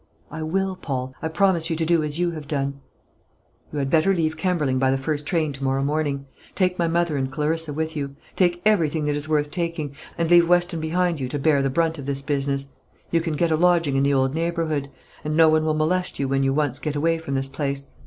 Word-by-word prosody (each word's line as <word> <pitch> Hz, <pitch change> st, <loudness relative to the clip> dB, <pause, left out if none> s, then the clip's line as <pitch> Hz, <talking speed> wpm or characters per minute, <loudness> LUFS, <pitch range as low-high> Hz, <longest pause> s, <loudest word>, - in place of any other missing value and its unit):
"I 160 Hz, +1 st, -6 dB
will, 190 Hz, +4 st, -1 dB
Paul; 130 Hz, -5 st, -4 dB
I -, -, -1 dB
promise 170 Hz, -1 st, +2 dB
you 165 Hz, -, 0 dB
to 160 Hz, 0 st, -1 dB
do 170 Hz, 0 st, +3 dB
as 150 Hz, 0 st, -2 dB
you 175 Hz, 0 st, +1 dB
have 155 Hz, -3 st, -8 dB
done." 140 Hz, -1 st, -2 dB, 0.9 s
"You 150 Hz, -, -5 dB
had 135 Hz, -1 st, -1 dB
better 180 Hz, +4 st, +4 dB
leave 160 Hz, -2 st, 0 dB
Kemberling 155 Hz, -6 st, 0 dB
by 130 Hz, 0 st, +3 dB
the 135 Hz, -, +2 dB
first 145 Hz, +2 st, -3 dB
train 160 Hz, -5 st, 0 dB
to 135 Hz, 0 st, -7 dB
morrow 135 Hz, 0 st, +1 dB
morning; 145 Hz, -1 st, -1 dB, 0.3 s
take 180 Hz, -2 st, +1 dB
my 170 Hz, -, +2 dB
mother 170 Hz, -2 st, +1 dB
and 130 Hz, -1 st, -2 dB
Clarissa 155 Hz, +2 st, 0 dB
with 160 Hz, +2 st, -3 dB
you; 140 Hz, -2 st, -4 dB, 0.2 s
take 175 Hz, -1 st, +1 dB
everything 165 Hz, -7 st, +2 dB
that 150 Hz, 0 st, 0 dB
is 145 Hz, +1 st, -4 dB
worth 150 Hz, -1 st, +1 dB
taking, 165 Hz, -5 st, -3 dB, 0.2 s
and 170 Hz, -, +1 dB
leave 170 Hz, -1 st, +6 dB
Weston 175 Hz, -1 st, +2 dB
behind 170 Hz, +1 st, 0 dB
you 130 Hz, -2 st, -3 dB
to 145 Hz, -, -2 dB
bear 145 Hz, 0 st, +3 dB
the 135 Hz, -, +1 dB
brunt 165 Hz, +2 st, 0 dB
of 140 Hz, -, -7 dB
this 140 Hz, -1 st, -2 dB
business. 140 Hz, -1 st, -1 dB, 0.5 s
You 165 Hz, -, +2 dB
can 165 Hz, -2 st, -2 dB
get 170 Hz, +2 st, +1 dB
a -, -, +4 dB
lodging 170 Hz, -4 st, +3 dB
in 135 Hz, -, +3 dB
the 140 Hz, +1 st, +3 dB
old 135 Hz, 0 st, +2 dB
neighbourhood, 160 Hz, -3 st, -1 dB, 0.3 s
and 150 Hz, +1 st, -1 dB
no 160 Hz, -1 st, +7 dB
one 155 Hz, 0 st, +3 dB
will 155 Hz, -1 st, +1 dB
molest 180 Hz, +4 st, 0 dB
you 140 Hz, -, -1 dB
when 135 Hz, 0 st, +1 dB
you 135 Hz, 0 st, +2 dB
once 145 Hz, -2 st, 0 dB
get 150 Hz, -2 st, -3 dB
away 165 Hz, +3 st, +1 dB
from 140 Hz, -4 st, -4 dB
this 135 Hz, 0 st, 0 dB
place. 140 Hz, 0 st, -3 dB
155 Hz, 240 wpm, -23 LUFS, 140-170 Hz, 0.9 s, no